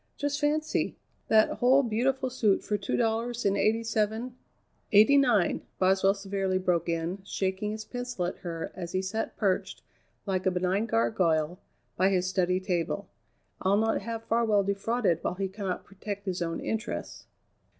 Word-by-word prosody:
Just 290 +1 -2
fancy! 305 +1 0 0.3
That 220 0 +3
whole 260 +3 +5
beautiful 255 +3 0
suit 215 -6 +2
for 210 - -1
two 200 - -2
dollars 230 +1 0
and 200 0 +3
eighty 225 +3 +2
seven 225 +2 -1 0.3
" - - -42
"Eighty 215 +7 +7
nine!" 245 -10 +3 0.2
Boswell 190 +1 +3
severely 195 -1 -1
broke 175 -2 0
in, 165 +3 -2
shaking 195 +1 -2
his 215 0 -6
pencil 245 -7 -4
at 175 - -4
her 165 -2 -5
as 175 -2 -7
he 185 0 0
sat 220 +4 -3
perched, 195 -3 -1 0.4
like 190 -2 -1
a - - +6
benign 185 +4 0
gargoyle, 155 - +1 0.4
by 190 +2 +4
his 185 -2 +1
study 185 -1 +1
table. 185 +1 -2 0.5
"I'll 195 +2 +3
not 220 0 +1
have 225 +2 -5
Farwell 225 -3 +2
defrauded 200 -2 0
while 180 - -1
he 195 +1 -1
cannot 190 -1 -4
protect 200 +1 -7
his 185 -2 -2
own 165 -1 -2
interests." 225 +1 -4
200 Hz, 160 wpm, -28 LUFS, 185-225 Hz, 0.5 s, Eighty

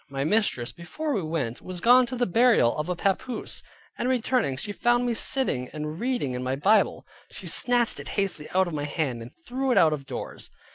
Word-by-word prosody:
My 135 0 -3
mistress, 150 - 0
before 285 - -5
we 205 - 0
went, 155 -8 -3
was 185 -1 -6
gone 245 +5 +5
to 255 - -5
the 245 0 +1
burial 225 - +4
of 150 +3 -3
a 180 - 0
papoose, 195 +7 -2 0.4
and 250 - 0
returning, 245 - 0
she 205 - -4
found 240 +3 +1
me 240 - 0
sitting 220 - -1
and 150 +1 -5
reading 240 - -1
in 125 - -4
my 130 +1 -1
Bible; 200 +9 +2 0.2
she - - -10
snatched 245 -2 +4
it - - -8
hastily 195 -6 -1
out 190 +1 +2
of 175 - -6
my 145 -1 -2
hand, 145 -5 -2
and 115 - -9 0.2
threw 265 +2 -2
it - - +2
out 160 -2 +5
of 140 -3 -6
doors. - - -7
185 Hz, 210 wpm, -26 LUFS, 145-245 Hz, 0.4 s, gone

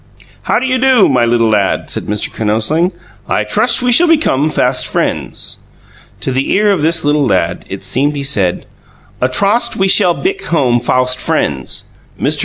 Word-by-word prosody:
"How - - +3
do 260 - -1
you 255 0 0
do, 255 -4 +4
my 125 -3 +2
little 115 -1 +1
lad," 100 -3 0
said - - -3
Mr. 105 0 -3
Kinosling. 115 - 0 0.4
"I - - 0
trust - - +2
we 250 - +2
shall 340 +9 +5
become 155 - +2
fast - - 0
friends." - - -3 0.6
To - - -2
the 130 +1 -1
ear 210 +1 +3
of 195 - 0
his 165 0 +1
little 145 -1 +1
lad, 90 -4 -1
it 95 - -7
seemed 145 +3 0
he 140 - -4
said, 100 -10 -1 0.6
"A 125 - +2
trost 210 - +1
we 190 - +1
shall 180 -2 +3
bick 395 +2 -3
home 125 -7 +1
fawst 125 +1 +1
frainds." - - -2 0.4
Mr. - - 0
145 Hz, 180 wpm, -13 LUFS, -, 0.6 s, shall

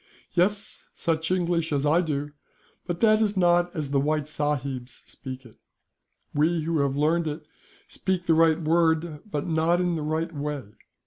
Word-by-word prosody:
"Yes, 200 +4 0
such 160 -1 -1
English 175 -3 0
as 145 -1 +1
I 160 +4 +4
do; 145 -3 -2 0.6
but 175 -1 -3
that 215 -1 +5
is 210 -2 +1
not 175 -1 +4
as 150 -4 -3
the 140 - +3
white 150 +1 0
sahibs 140 -4 -3
speak 130 0 -9
it. 115 - -16 0.8
We 160 +3 +2
who 165 0 0
have 140 -1 +1
learned 160 +3 +2
it 150 +1 -5 0.4
speak 185 -2 -2
the 165 - +4
right 160 0 +4
word, 160 -1 +1
but 145 -7 -2
not 165 +1 +2
in 175 -1 +1
the 160 - -3
right 160 +2 -2
way. 145 -1 -3
160 Hz, 170 wpm, -26 LUFS, 150-175 Hz, 0.8 s, that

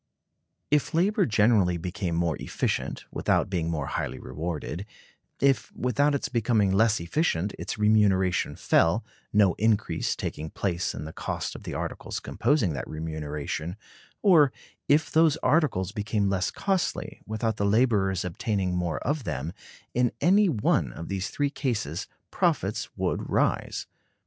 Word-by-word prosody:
If 150 +1 +2
labor 195 +3 +3
generally 105 -5 +3
became 90 0 -3
more 85 -2 +1
efficient, - - -2
without 95 - +1
being 85 -3 0
more 75 -4 -2
highly 65 -1 -3
rewarded; 80 +7 -5 0.5
if, 135 -4 +2
without 140 +4 +2
its 140 - -1
becoming 110 -4 +2
less 110 +3 +3
efficient, 95 - 0
its - - -4
remuneration 105 -4 +3
fell, 90 +7 +2 0.3
no 100 -4 +4
increase 110 -1 +1
taking 80 +1 -4
place 90 -1 -2
in - - -6
the 80 - -8
cost - - -3
of - - -10
the - - -4
articles - - -4
composing 125 - +1
that 70 - -5
remuneration; 80 +1 -4 0.5
or 160 - +6 0.4
if 150 +2 +3
those 160 -2 +4
articles 140 - +2
became 105 -1 0
less 95 -2 +1
costly, 195 -2 -2
without 110 0 -1
the - - -1
laborers 100 -5 +2
obtaining 95 0 -1
more 90 -2 -1
of 145 +1 0
them; 75 - -3 0.4
in 125 -1 +2
any 200 +2 +5
one 100 - +1
of 85 - -8
these 95 -1 -2
three 145 -1 -1
cases, 105 - -2 0.2
profits - - 0
would - - -1
rise. - - 0
100 Hz, 140 wpm, -27 LUFS, 85-125 Hz, 0.5 s, or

